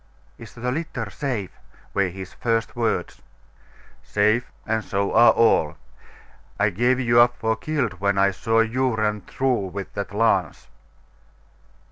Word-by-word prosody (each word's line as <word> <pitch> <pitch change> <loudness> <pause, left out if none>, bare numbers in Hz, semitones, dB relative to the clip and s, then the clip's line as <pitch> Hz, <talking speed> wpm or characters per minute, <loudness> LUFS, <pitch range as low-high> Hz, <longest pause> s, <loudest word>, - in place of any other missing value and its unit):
'Is - - -12
the 125 +1 -3
litter 135 -7 -4
safe'?' 115 -5 -4 0.3
were 100 -1 +2
his 95 +1 -9
first 115 -1 -1
words. 115 -2 -2 0.8
'Safe; 110 +4 +1
and 110 0 -1
so 100 0 -2
are 120 +1 +7
all. 80 -10 +3 0.8
I 100 +1 +3
gave 120 +7 +1
you 120 -2 +3
up 120 0 +5
for 110 0 0
killed 115 - -2
when 100 0 +1
I 100 0 +4
saw 115 +4 +1
you 125 +2 0
run 105 -1 -1
through 125 0 -1
with 95 +1 -7
that 100 -1 -4
lance. 100 -6 0
110 Hz, 140 wpm, -23 LUFS, 100-120 Hz, 0.8 s, are